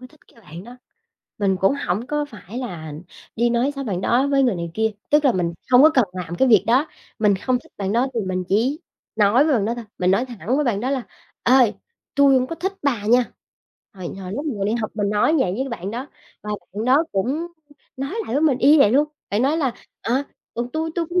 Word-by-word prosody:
có 255 - -10
thích 305 +3 -24
cái 230 - -20
bạn 175 -2 -11
đó, 245 +2 -12 0.6
mình 195 -2 +1
cũng 195 +8 +3
hổng 205 +8 -1
có 295 0 -1
phải 225 -3 -9
là 170 - -6 0.4
đi 235 +1 +2
nói 240 +4 +1
xấu 275 0 -5
bạn 190 -6 -2
đó 245 +7 +2
với 275 -1 +3
người 245 -5 +2
này 170 -1 -4
kia, 220 0 +1 0.2
tức 295 0 +4
là 260 - +5
mình 170 -3 -1 0.2
hông 250 +2 +7
có 310 - +8
cần 255 - +5
làm 175 -2 -5
cái 265 +8 +2
việc 215 -4 +5
đó. 255 +7 +3 0.3
Mình 210 -2 +3
không 250 +5 0
thích - - -22
bạn 195 0 -2
đó 245 +3 +2
thì 230 - 0
mình 185 -2 -2
chỉ 255 - +1 0.4
nói 220 +7 +4
với 315 - +2
bạn 215 -5 +1
đó 230 +3 -1
thôi, 240 -2 -7
mình 180 0 +2
nói 225 +6 +2
thẳng 240 - -3
với 300 - +1
bạn 215 -6 0
đó 255 - -1
là 270 -2 -1 0.4
"Ê, 245 - +3 0.6
tui 280 -1 +5
hổng 255 0 +2
có 330 - -5
thích 380 +4 -2
bà 235 -8 0
nha." 245 +2 +5 0.7
Hồi 185 -3 -7
hồi 185 0 -6
lúc 285 +7 -4
mình 280 - -2
còn 195 - -1
đi 215 - 0
học 220 -3 -2
mình 205 -2 -1
nói 210 +10 +2
vậy 185 -9 +1
với 265 +1 -2
bạn 195 -5 -5
đó 245 +5 -5 0.4
và 210 - -6 0.2
bạn 215 +2 -3
đó 270 +6 +4
cũng, 195 +1 0
ưm, 310 +7 -2 0.5
nói 275 +3 -4 0.2
lại 235 - -3
với 285 - +2
mình 275 -5 +3
y 280 +3 +6
như 310 - +6
vậy 240 -7 +6
luôn, 290 +5 +3 0.2
bạn 210 +4 +1
nói 290 +4 +2
là, 270 -7 0 0.3
à, 260 +4 0 0.3
ừ, 240 +1 -3
"Tui 320 +1 -2
tui 340 -2 -1
cũng 360 +2 0
240 Hz, 260 wpm, -22 LUFS, 205-275 Hz, 0.7 s, có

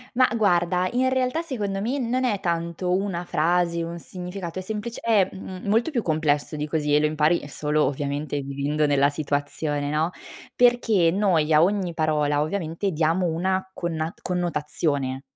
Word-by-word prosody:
ma 255 +1 +5
guarda, 180 -3 +2
in 255 +1 +2
realtà 260 +4 0
secondo 210 -11 -3
me 245 +7 -1
non 255 +1 0
è 215 -6 +1
tanto 170 0 -2
una 190 -2 -2
frase, 170 +1 +1
un 170 +1 -5
significato, 180 0 -6
è - - -4
semplice 215 +4 -5
è 210 -5 +3
m 190 -1 -8
molto 225 +9 +2
più 245 -5 0
complesso 155 -3 0
di 150 0 -3
così 150 -1 0
e 150 - +5
lo 150 - +2
impari, 155 +2 +2
uhm, - - -9
solo 150 +1 0
ovviamente 145 +1 -2
vivendo 140 +2 -1
nella 140 -1 +3
situazione, 145 0 -2
no. 155 +4 0 0.4
Perché 230 -8 +4
noi 175 -6 +2
a 150 - +6
ogni 190 -2 0
parola, 150 -2 +1
ovviamente 165 +3 -2
diamo 165 +3 +1
una 185 +3 -1
connat 165 -2 -4
connotazione 150 -6 -1
170 Hz, 165 wpm, -24 LUFS, 150-195 Hz, 0.4 s, a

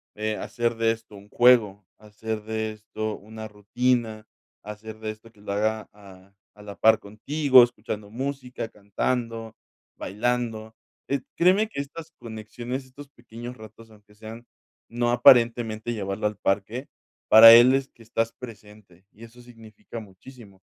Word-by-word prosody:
eh, 110 0 -3
hacer 120 -1 -2
de 115 0 +2
esto 115 -2 -8
un 100 0 -14
juego, 110 -6 +4
hacer 105 0 -6
de 110 0 -3
esto 110 0 -6
una 110 +1 -10
rutina, 110 +1 -1 0.4
hacer 105 +1 -9
de 110 - -5
esto 110 +1 -15
que 105 - -23
lo 100 - -6
haga 110 +1 -1
a 100 -1 -17 0.2
a 105 - -17
la 100 -1 -9
par 110 0 +5
contigo, 130 +6 +4
escuchando 105 -3 -5
música, 130 -1 -5
cantando, 115 +2 -4 0.4
bailando. 110 +1 -3 0.3
Eh, 140 -1 -1 0.2
créeme 190 +5 +3
que 180 - -7
estas 155 +3 -10
conexiones, 120 +3 -7
estos 140 +3 -13
pequeños 120 -1 -10
ratos, 110 +1 -14
aunque 105 -1 -21
sean 110 +2 -11 0.4
no 120 0 -1
aparentemente 120 -2 +4
llevarlo 100 0 -2
al 105 - -5
parque, 105 +7 -2 0.4
para 115 +1 +11
él 120 +2 +8
es 135 0 0
que 115 - -19
estás 115 0 -2
presente, 105 -6 -14
y 110 - -16
eso 115 +2 -14
significa 115 -1 -12
muchísimo. 100 0 -15
110 Hz, 150 wpm, -25 LUFS, 105-120 Hz, 0.4 s, para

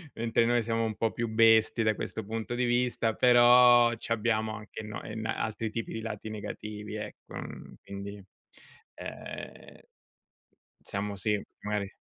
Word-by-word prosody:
mentre 115 0 +1
noi 120 0 +2
siamo 115 0 0
un 110 -1 -2
po' 115 +1 0
più 120 - -2
bestie 110 0 +4
da 110 0 +3
questo 110 - -5
punto 115 +3 -4
di 125 - +1
vista, 120 -2 +1
però 120 0 +7
c'abbiamo 110 -1 -1
anche 105 0 -8
no 105 0 -7
en 110 0 -6
altri 110 0 -2
tipi 115 +1 -4
di 110 - -4
lati 110 -1 -5
negativi 105 0 -6
ecco, 105 0 -8
uhm, - - -8
quindi, 100 0 -8 0.7
ehm - - -8 1.1
diciamo 100 +1 -3
sì, 105 +2 0 0.2
magari 105 -2 -3
110 Hz, 145 wpm, -29 LUFS, 105-115 Hz, 1.1 s, però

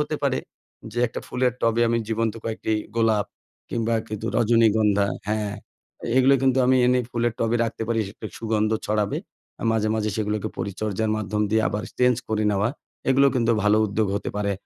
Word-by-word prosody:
হতে 150 +1 -1
পারে 140 -2 +1 0.5
যে 120 - -4
একটা 115 - -6
ফুলের 125 0 0
টবে 115 0 +2
আমি 115 0 +2
জীবন্ত 115 -1 0
কয়েকটি 110 0 -2 0.2
গোলাপ 110 -3 +2 0.4
কিংবা 115 0 0
কিছু 110 +1 -5
রজনীগন্ধা 110 -3 +3 0.2
হ্যাঁ, 105 -1 -1 0.6
এগুলো 130 +1 +6
কিন্তু 130 -1 +3
আমি 130 +1 +4
এনে 125 0 +3
ফুলের 120 -1 0
টবে 115 +1 +1
রাখতে 115 0 -4
পারি 115 -1 +1
সে - - 0
সেটার 105 +1 -9
সুগন্ধ 110 -1 0 0.2
ছড়াবে। 105 -1 0 0.4
আ - - -6
মাঝে, 110 -1 +1
মাঝে 110 -1 0
সেগুলোকে 105 -1 -1
পরিচর্যার 105 +2 -2
মাধ্যম 105 0 -1
দিয়ে 110 +1 +3
আবার 105 - -3 0.2
চেঞ্জ 125 -1 +4
করে 110 -1 0
নেওয়া 100 +2 +1 0.4
এগুলো 135 +1 +5
কিন্তু 120 -2 +2
ভালো 105 +1 +4
উদ্যোগ 105 +1 0
হতে 100 - -4
পারে 100 -1 0
110 Hz, 175 wpm, -24 LUFS, 105-120 Hz, 0.6 s, এগুলো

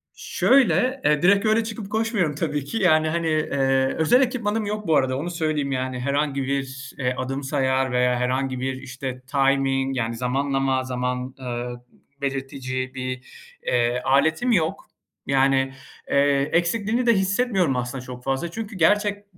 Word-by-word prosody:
Şöyle, 260 0 +2
e, 150 +1 +3
direkt 200 +4 +4
öyle 220 +1 +3
çıkıp 215 -2 -7
koşmuyorum 215 - 0
tabii 150 -3 -2
ki, 225 - -4
yani, 155 -5 +3
hani, 165 0 -1
eee, 135 -4 +1
özel 240 +12 +4
ekipmanım 225 -4 0
yok 210 0 -4
bu 160 - +3
arada 130 -2 +2
onu 160 +6 -3
söyleyeyim, 155 -4 -1
yani, 130 -1 -2
herhangi 140 +1 0
bir, 135 0 -3
eee, 125 -1 0
adım 135 +2 -3
sayar 130 -2 0
veya 125 0 +2
herhangi 130 +1 -1
bir, 130 0 -3
işte, 130 0 -6
timing, 135 0 +1
yani, 115 -1 -1
zamanlama, 135 +1 0
zaman, 125 0 -3
eee, 120 -1 -4 0.5
belirtici 130 -2 -3
bir, 130 -1 -4 0.4
eee, 120 0 +1
aletim 160 - +2
yok. 165 -7 0 0.4
Yani, 135 -1 +2 0.4
eee, 140 0 +3
eksikliğini 215 +8 +1
de 235 - +5
hissetmiyorum 190 - +1
aslında 125 +1 -3
çok 125 -1 -9
fazla. 135 +6 -2
Çünkü 220 +1 -6
gerçek 205 +4 +2
140 Hz, 150 wpm, -23 LUFS, 130-175 Hz, 0.5 s, de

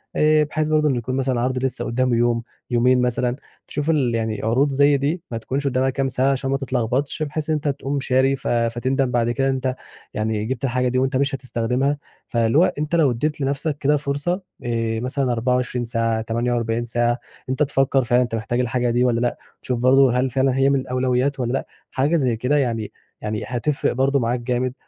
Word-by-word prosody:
آآ، 155 0 +4
بحيث 155 +1 -2
برضه 155 -1 +3
إن 135 - +1
يكون 125 +2 -3
مثلًا 130 -2 0
عرْض 130 +1 0
لسه 130 -1 -2
قدامه 125 +1 +1
يوم، 115 0 +1 0.3
يومين 125 +1 +3
مثلًا، 125 0 0 0.3
تشوف 150 +1 -3
ال 135 -7 +2
يعني 110 -2 -2
عروض 130 +6 +2
زي 140 +1 +4
دي 150 +6 -1
ما 115 - -2
تكونش 135 +5 -2
قدامها 130 0 +1
كام 135 +1 -1
ساعة 130 +1 +1
عشان 135 0 -2
ما 135 - +2
تتلخبطش 130 +2 -1
بحيث 150 +1 -3
إن 155 - +2
أنت 150 0 -3
تقوم 140 0 -2
شاري 135 +1 +2
ف - - -7
فتندم 120 +3 0
بعد 120 -1 +1
كده 135 +2 0
إن - - +2
أنت 130 -1 -2 0.4
يعني 110 0 -1
جبت 130 +2 -4
الحاجة 125 -1 +1
دي 130 +1 0
وأنت 130 +1 +1
مش 140 0 +1
هتستخدمها، 125 +3 -1 0.3
فاللي 115 +2 +1
هو 170 - +7 0.2
أنت 150 +3 -1
لو 150 -6 +4
أديت 150 +5 -2
لنفسك 140 +2 -1
كده 150 +1 +2
فرصة 145 +7 -2 0.2
آآ، 115 -1 -1
مثلًا 130 +1 -1
24 125 0 0
ساعة 115 -1 0
48 115 0 -1
ساعة 120 0 +1
إن 120 - -7 0.3
أنت 130 +3 +1
تفكر 135 -1 +2
فعلًا 120 +1 +3
أنت 120 -2 -3
محتاج 115 +2 -2
الحاجة 125 0 0
دي 120 +1 +2
والَّا 120 -2 +2
لأ، 120 0 0 0.2
تشوف 125 -2 -2
برضه 130 0 +5
هل 130 +1 +1
فعلًا 130 +1 +1
هي 135 +1 +3
من 140 -1 +2
الأولويات 130 +2 0
والَّا 120 -1 -1
لأ، 135 - -2 0.2
حاجة 145 +6 +1
زي 130 -7 +1
كده 125 +6 +1
يعني 115 -6 -1 0.3
يعني 105 +1 -3
هتفرق 130 +4 0
برضه 135 +2 +2
معاك 120 0 0
جامد، 125 +1 -1
130 Hz, 205 wpm, -22 LUFS, 120-140 Hz, 0.4 s, هو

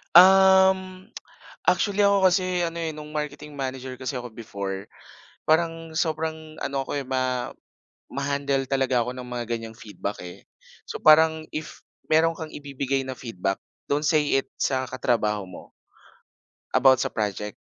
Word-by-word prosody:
Um, 190 0 +6 0.5
actually 205 0 +2
ako 200 -1 +5
kasi 180 0 +1
ano, 170 0 -2
eh, 165 -2 -2
nung 150 0 -9
marketing 150 -1 -5
manager 130 -1 -4
kasi 130 0 -4
ako 125 - -7
before, 100 -4 -6 0.6
parang 165 0 +1
sobrang 160 -1 -2
ano 135 0 -2
ako, - - -3
eh, 140 - -2
ma 130 -1 -1 0.6
ma-handle 140 0 -1
talaga 130 -3 +2
ako 125 - -4
ng 125 -1 -8
mga 125 -1 -4
ganiyang 115 -1 -4
feedback, 105 -2 -6
eh. 90 - -11 0.4
So - - -5
parang 160 0 +6
if 155 0 -7 0.2
meron 165 +1 +4
kang 160 -1 -7
ibibigay 135 -1 -2
na 130 - -4
feedback, 95 -5 -3 0.3
don't 145 +1 0
say 150 -3 +3
it - - -8
sa 130 -1 0
katrabaho 105 -5 0
mo 90 - -12 1.0
about 130 -1 +6
sa - - +1
project, 105 -1 -3
140 Hz, 145 wpm, -25 LUFS, 125-160 Hz, 1.0 s, Um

